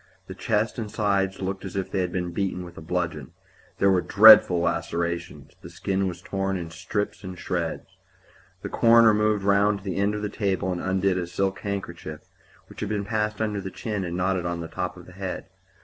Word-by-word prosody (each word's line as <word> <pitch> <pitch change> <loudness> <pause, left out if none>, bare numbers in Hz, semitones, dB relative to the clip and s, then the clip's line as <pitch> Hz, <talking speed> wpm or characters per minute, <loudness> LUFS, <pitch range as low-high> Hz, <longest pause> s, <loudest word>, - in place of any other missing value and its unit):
The 95 - -8
chest 105 +4 -1
and 110 -2 -4
sides 100 -2 0
looked 95 0 -3
as 95 -1 -7
if 95 -1 -3
they 95 - -1
had 90 -1 -1
been 90 -1 -2
beaten 90 -1 -2
with 85 0 -12
a - - -9
bludgeon. 80 -4 -3 0.4
There 100 - +4
were 90 -1 +3
dreadful 105 -4 +8
lacerations; 85 0 -2
the - - -10
skin 95 0 -1
was 90 0 -6
torn 95 -1 -2
in 85 -2 -6
strips 105 +6 -3
and 95 -1 -7
shreds. 85 -2 -3 0.8
The - - -4
coroner 115 -1 +6
moved 105 -1 +1
round 100 +1 +3
to 95 - -14
the 95 - -3
end 100 +1 +1
of 105 - -4
the - - 0
table 95 -3 -1
and 90 - -3
undid 95 0 +1
a 90 - -3
silk 95 +2 -1
handkerchief, 85 -6 -5 0.4
which - - -14
had 105 - -3
been 105 -1 -2
passed 105 0 -1
under 105 -2 -2
the 95 - -5
chin 105 0 -4
and 85 -1 -4
knotted 90 -1 0
on 85 0 -3
the 85 - -5
top 90 +1 -4
of 90 - -12
the - - -14
head. 95 -1 -5
95 Hz, 210 wpm, -25 LUFS, 90-100 Hz, 0.8 s, dreadful